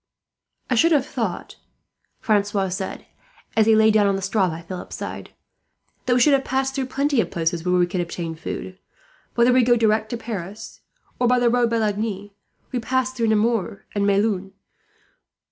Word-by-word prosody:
"I - - 0
should 330 +8 +4
have 280 -3 +3
thought," 225 -9 -4 0.6
Francois 205 -2 +1
said, 190 +1 -5 0.5
as 220 -1 +4
he 220 - +6
lay 220 0 +5
down 210 -1 +4
on 195 - +2
the 195 - -4
straw 195 -1 +1
by 165 +1 -6
Philip's 180 +1 -7
side, - - -6 0.8
"that 245 - +3
we - - +3
should 285 +4 +5
have 270 -1 +3
passed 265 +1 -1
through 270 -2 -2
plenty 275 -1 +1
of - - -4
places 165 0 -1
where 180 0 +1
we 175 - +4
could 175 +1 -2
obtain 170 -1 -4
food. 185 +3 -7 0.6
Whether 240 +1 +4
we 255 - +5
go 240 0 +4
direct 220 -1 +1
to 240 - -3
Paris, 210 -3 -7 0.4
or 245 - +3
by 250 +1 +4
the 245 -1 +3
road 245 -1 +2
by 230 - 0
Lagny, 205 -2 -2 0.4
we 250 - -1
pass 260 +2 -1
through 235 -3 0
Nemours 220 -2 +1
and 205 -1 0
Melun." 195 -1 +1
220 Hz, 185 wpm, -22 LUFS, 195-245 Hz, 0.8 s, he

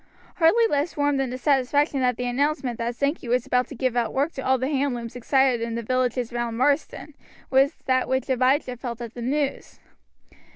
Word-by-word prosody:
Hardly 365 +8 +4
less 295 -5 -1
warm 285 -1 +1
than 270 -2 -1
the 255 - -5
satisfaction 280 +1 +1
that 250 -2 +1
the 250 - -3
announcement 260 -1 -1
that 235 +1 -2
Sankey 280 0 -2
was 250 +1 +1
about 250 -1 +1
to 280 - -9
give 255 0 -1
out 235 -2 -1
work 285 +5 +1
to 270 - -6
all 260 0 +2
the 260 +1 -2
hand 280 -2 0
looms 235 -1 -7
excited 255 0 +2
in 230 0 -3
the 235 - -3
villages 250 0 -1
round 240 -1 -2
Marsden, 290 +3 0 0.4
was 275 +3 +3
that 255 -1 +1
which 260 -1 0
Abijah 260 0 +1
felt 235 -1 -6
at 235 -2 -7
the 240 - -8
news. 275 +3 -2
260 Hz, 205 wpm, -24 LUFS, 245-280 Hz, 0.4 s, Hardly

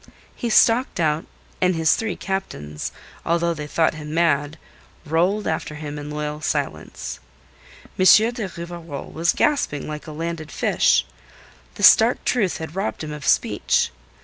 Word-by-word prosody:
He 235 - -3
stalked 230 +1 +4
out, 155 -1 +1 0.4
and 180 -1 +3
his 160 -1 +3
three 220 -4 -2
captains 75 - -4 0.3
although 170 0 +1
they 150 -2 -6
thought 160 +2 +1
him 155 0 -7
mad 155 -2 +1 0.5
rolled 180 +7 +1
after 160 -1 -2
him 150 -1 -6
in 145 0 -7
loyal 150 0 -4
silence. 145 -2 -3 0.8
M. 185 - +3 0.3
de 230 -5 -4
Rivarol 170 -4 -7
was 165 +2 +1
gasping 280 - 0
like 150 0 -7
a - - -6
landed 160 -1 -5
fish. - - +2 0.7
The 205 - -6
stark 225 +4 +6
truth 210 -8 +1
had 160 +1 -7
robbed 160 - -3
him 155 - -5
of 150 -2 -7
speech. - - +2
160 Hz, 150 wpm, -22 LUFS, 150-185 Hz, 0.8 s, stark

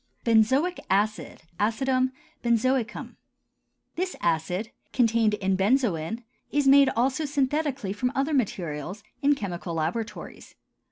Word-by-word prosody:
BENZOIC 260 +10 +3
ACID 205 -2 0 0.2
(ACIDUM 255 +4 +1 0.3
BENZOICUM). 240 +1 0 0.8
This 365 +2 -2
acid, 175 +6 -1 0.2
contained 230 -3 +3
in 195 -2 0
benzoin, 210 - +1 0.3
is 290 -1 +2
made 275 0 +7
also 260 +6 +1
synthetically 280 -6 -1
from 250 +4 -1
other 280 +3 0
materials, 185 - -2 0.2
in 285 0 +4
chemical 175 -7 -5
laboratories. 170 +8 -4
230 Hz, 105 wpm, -26 LUFS, 195-270 Hz, 0.8 s, made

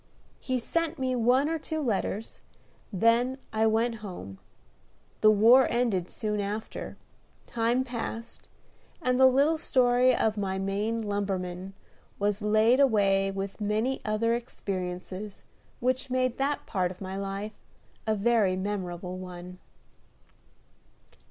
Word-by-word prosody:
He 255 -1 -1
sent 330 +6 -1
me 260 -1 -1
one 250 +4 +3
or 325 0 -1
two 315 +1 -4
letters, 220 -4 -2 0.5
then 230 +6 +2 0.2
I 220 0 +3
went 225 +1 +1
home; 135 - -8 0.8
the 215 - +6
war 230 +5 +6
ended 220 -8 0
soon 210 -1 -3
after, 210 +2 -5 0.5
time 235 +2 +1
passed, 235 -2 -6 0.5
and 255 -6 +1
the 260 - +8
little 285 +5 +3
story 250 -2 +3
of 220 -1 +1
my 190 -2 -1
Maine 205 +4 -1
lumberman 195 -2 -3 0.4
was 205 +1 0
laid 215 +4 +4
away 200 -7 +3
with 195 +2 -5
many 215 +6 0
other 215 +2 +1
experiences 190 -3 -5 0.4
which 255 +2 0
made 255 -1 0
that 280 +2 -1
part 185 -4 0
of 180 - -10
my 190 -1 -5
life 195 +2 -4 0.5
a 220 - +2
very 210 -3 +2
memorable 185 -2 -4
one. 180 0 -9
215 Hz, 125 wpm, -28 LUFS, 195-250 Hz, 0.8 s, the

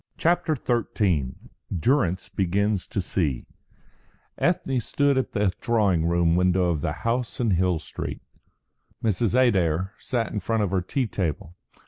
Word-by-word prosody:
CHAPTER 170 -1 +2
XIII 100 - 0 0.4
DURRANCE 95 - +1
BEGINS 100 +1 0
TO 100 - -2
SEE 80 -8 -1 0.9
Ethne 135 -2 +1
stood 140 +4 +1
at 130 - -1
the 105 -3 +2
drawing 100 -9 +2
room 85 -1 +2
window 90 0 +3
of 80 -4 -2
the - - -1
house 115 -3 -1
in 115 -4 +1
Hill 90 -1 +2
Street. 80 - -6 0.8
Mrs. 110 +1 +1
Adair 95 -6 +2
sat 120 -4 -2
in 105 - -1
front 110 0 0
of 95 - -1
her 95 -2 +1
tea 130 +8 -1
table. 85 -5 -3
100 Hz, 140 wpm, -25 LUFS, 85-120 Hz, 0.9 s, window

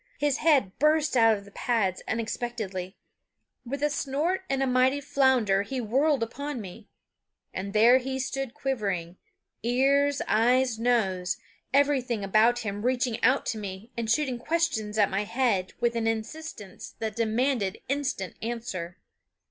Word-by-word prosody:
His 290 -2 +1
head 285 - +3
burst 305 0 +3
out 225 -3 +5
of 200 - -12
the 200 - -15
pads 200 -5 0
unexpectedly; 220 -5 -4 0.7
with 280 +4 -4
a 295 - +3
snort 295 +7 -1
and 270 0 +1
a - - +2
mighty 255 +2 +3
flounder 265 -8 +2
he 255 +6 -4
whirled 265 +4 +2
upon 280 +4 -5
me; 205 +1 -10 0.6
and 195 +1 -4
there 230 +5 +6
he 265 +1 -4
stood 270 -1 -3
quivering, 195 -10 -2 0.4
ears, 275 +4 +2
eyes, 245 +1 +2
nose, 195 -7 +1 0.3
everything 265 -5 +2
about 220 +5 +3
him 205 0 -3
reaching 245 -1 0
out 265 +2 +3
to 220 - -2
me 200 +3 -7
and 230 -2 -3
shooting 255 0 +1
questions 240 -9 -1
at 205 -2 +3
my 195 +2 0
head 210 -5 0
with 235 0 +1
an 230 -1 0
insistence 225 -1 -5
that 220 -2 -4
demanded 230 -2 0
instant 270 -9 -2
answer. 220 -7 -5
240 Hz, 145 wpm, -27 LUFS, 210-270 Hz, 0.7 s, there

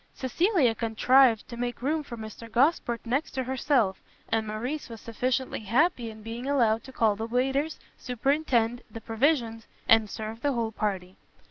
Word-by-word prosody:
Cecilia 295 - +2
contrived 230 +1 +3
to 240 - -8
make 240 0 -4
room 310 +3 +1
for 245 -5 -8
Mr 220 +1 -9
Gosport 240 -2 +1
next 265 +6 -1
to 260 - -1
herself, 250 -6 +1 0.3
and 220 -1 0
Morrice 250 +8 -4
was 230 -1 -8
sufficiently 255 +4 -2
happy 240 - +1
in 215 -1 -11
being 230 +4 -6
allowed 230 -6 +2
to 265 - -10
call 225 -5 +2
the 220 +2 -4
waiters, 270 +6 0 0.2
superintend, 245 -2 0
the 225 - -8
provisions, 225 -1 0 0.2
and 225 -2 +5
serve 220 +2 -6
the 285 0 +1
whole 230 -2 -1
party. 190 -4 -3
235 Hz, 160 wpm, -27 LUFS, 225-265 Hz, 0.3 s, and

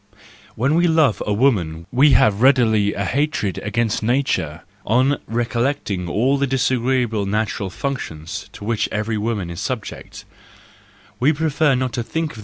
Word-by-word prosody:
—When 130 +6 +1
we 175 +2 +3
love 160 -8 +3
a - - 0
woman 95 - +1
we 140 +4 +5
have 105 0 +3
readily 115 -6 +3
a 100 - -2
hatred 135 -6 -1
against 110 +1 -1
nature, 110 - 0 0.2
on 130 +6 +2
recollecting 115 -5 -1
all 130 +9 +1
the 140 - +1
disagreeable 125 -4 0
natural 105 -1 -1
functions 90 - -5
to 100 - -9
which 115 -1 0
every 105 +1 -2
woman 105 -5 -2
is 85 - -7
subject; - - -6 0.9
we 135 +5 +4
prefer 155 -2 +1
not 125 -1 -2
to 120 - -1
think 160 +6 -3
of - - -10
120 Hz, 150 wpm, -20 LUFS, 105-135 Hz, 0.9 s, we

